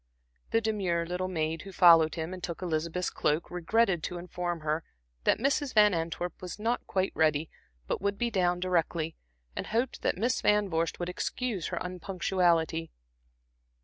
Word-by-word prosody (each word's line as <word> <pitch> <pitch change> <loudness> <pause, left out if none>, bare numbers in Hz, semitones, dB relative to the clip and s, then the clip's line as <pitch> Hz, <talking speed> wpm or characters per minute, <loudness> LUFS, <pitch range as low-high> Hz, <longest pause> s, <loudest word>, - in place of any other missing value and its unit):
The 225 - +2
demure 190 -6 0
little 180 +2 -2
maid 160 -2 -2
who 195 - -9
followed 165 -4 +6
him 165 +2 -4
and 185 -2 -8
took 170 +1 -4
Elizabeth's 170 +1 -1
cloak, 155 +2 0
regretted 180 +1 +2
to 180 - -4
inform 175 -1 -4
her 155 +1 -1 0.4
that - - +4
Mrs. 275 +2 0
Van 210 -1 +6
Antwerp 170 +1 -3
was 180 +1 -6
not 230 +3 -1
quite 190 0 0
ready, 155 0 +1 0.3
but - - -2
would 200 0 0
be 235 +2 0
down 180 -3 +1
directly, 170 -3 0 0.4
and - - -4
hoped 235 +3 -1
that - - 0
Miss 240 +6 +1
Van 210 -1 +3
Vorst 165 +1 0
would 175 - -2
excuse 205 -1 -2
her - - -4
unpunctuality. 175 -2 0
180 Hz, 165 wpm, -29 LUFS, 165-200 Hz, 0.4 s, followed